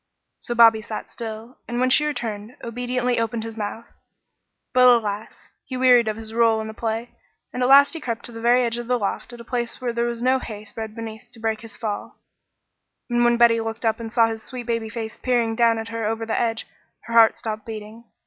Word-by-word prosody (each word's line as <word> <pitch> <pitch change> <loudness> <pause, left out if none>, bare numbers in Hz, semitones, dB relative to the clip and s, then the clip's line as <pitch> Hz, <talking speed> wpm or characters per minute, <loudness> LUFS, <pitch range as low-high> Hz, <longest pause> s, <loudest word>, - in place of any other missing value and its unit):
So 240 - -4
Bobby 225 -2 +7
sat 215 0 -7
still, 225 +1 -7
and 240 0 -3
when 255 0 +2
she 300 - +5
returned, 225 -5 -4
obediently 245 +1 -1
opened 230 0 -2
his 225 -1 -7
mouth; 220 +1 -5 0.9
but 255 0 +6
alas! 220 -3 +1
he 255 - -6
wearied 250 -2 +5
of 215 0 -1
his 220 -1 -8
rôle 230 -1 +3
in 220 - -4
the 220 - -7
play, 225 +1 -3 0.4
and 250 - -3
at 250 - +2
last 280 +4 +7
crept 235 -4 -3
to - - -5
the 225 -1 -8
very 245 +2 +4
edge 235 0 -1
of 240 - -6
the 250 0 +2
loft 205 +2 -3
at 240 - -10
a - - -9
place 235 0 -3
where 245 -2 -2
there 235 0 0
was 235 0 -4
no 260 +1 +3
hay 215 -3 -8
spread 220 -1 -7
beneath 220 -1 -8
to 230 - -14
break 220 -1 -1
his 225 -2 -11
fall; 215 -3 -5 0.9
and 240 0 +3
when 240 0 +4
Betty 235 -1 +5
looked 225 +1 -5
up 225 0 +1
and 225 -1 -6
saw 235 -1 +5
his 225 -1 -5
sweet 250 +1 -7
baby 230 -2 -2
face 220 -1 -6
peering 240 -3 +1
down 230 -1 +3
at 225 0 -5
her 230 0 -4
over 225 +1 -2
the 225 - -1
edge, 225 -1 -1 0.4
her 230 - -8
heart 225 -1 +6
stopped 215 -1 -5
beating. 220 +1 -8
230 Hz, 225 wpm, -23 LUFS, 220-240 Hz, 0.9 s, Bobby